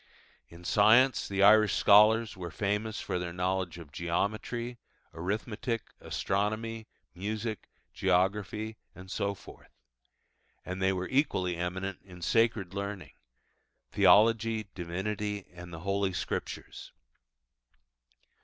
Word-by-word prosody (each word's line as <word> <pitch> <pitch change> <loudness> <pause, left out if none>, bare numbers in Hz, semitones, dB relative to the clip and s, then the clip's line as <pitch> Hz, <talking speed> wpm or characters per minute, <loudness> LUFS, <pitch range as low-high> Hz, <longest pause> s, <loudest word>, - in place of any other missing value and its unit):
In 85 +1 -14
science 115 +8 +4
the 100 0 +1
Irish 105 0 +6
scholars 110 +2 +5
were 90 -2 -6
famous 105 +4 -2
for 90 - -2
their 90 -1 -4
knowledge 90 -1 -2
of 80 -4 -11
Geometry, 110 - -2 0.3
Arithmetic, 110 +6 -3
Astronomy, 110 +3 -2 0.3
Music, 110 +4 -4 0.2
Geography, 100 +4 0 0.2
and 95 +1 -11
so 100 0 -1
forth. - - -15 1.0
And 90 +1 -5
they 95 0 +3
were 90 -1 -2
equally 95 - +1
eminent 90 +2 -3
in 90 -2 -12
sacred 110 -4 +1
learning 100 -1 -5 0.8
Theology, 110 0 +4
Divinity, 100 +3 -3
and 90 0 -10
the 80 -1 -8
Holy 100 0 0
Scriptures. - - -5
100 Hz, 105 wpm, -30 LUFS, 90-110 Hz, 1.0 s, Irish